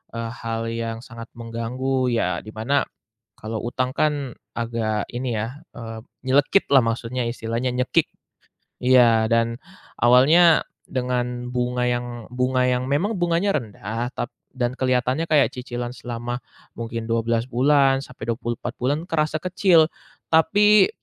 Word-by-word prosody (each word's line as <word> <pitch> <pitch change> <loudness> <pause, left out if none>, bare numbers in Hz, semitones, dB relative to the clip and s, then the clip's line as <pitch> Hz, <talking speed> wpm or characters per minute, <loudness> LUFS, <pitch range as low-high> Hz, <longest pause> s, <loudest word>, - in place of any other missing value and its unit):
eee, 115 0 -3
hal 115 -1 -4
yang 115 -1 -3
sangat 115 -1 -10
mengganggu. 125 +3 -2
Ya, 90 -6 0
di 110 - -8
mana, 130 +6 +1 0.5
kalau 110 +1 -4
hutang 125 +2 -1
kan 145 -4 0 0.2
agak 115 -3 -1
ini 120 -1 -2
ya, 115 +6 -4 0.2
eee, 115 -1 -7 0.3
nyelekit 145 +8 +3
lah 135 - +8
maksudnya, 115 +2 -2
istilahnya 115 +2 -2
nyekik. 125 0 +2 0.8
Iya, 120 -3 +5
dan 115 0 +2 0.4
awalnya 150 +8 +6 0.3
dengan 125 -1 -2
bunga 125 0 0
yang 120 -1 -4
bunga 125 0 +1
yang 125 0 0
memang 190 +9 0
bunganya 175 +3 +1
rendah, 115 0 -4
tap 120 - -3 0.2
dan 125 0 -2
kelihatannya 130 +4 +1
kayak 150 -3 +4
cicilan 120 -1 -4
selama 120 0 -5 0.4
mungkin 115 0 -4
12 115 0 +1
bulan, 135 +1 +4
sampai 120 -3 -9
24 120 +1 -4
bulan, 140 +4 +1
kerasa 155 -1 +1
kecil. 180 -3 +4 0.4
Tapi, 205 +4 +5
125 Hz, 130 wpm, -23 LUFS, 115-135 Hz, 0.8 s, lah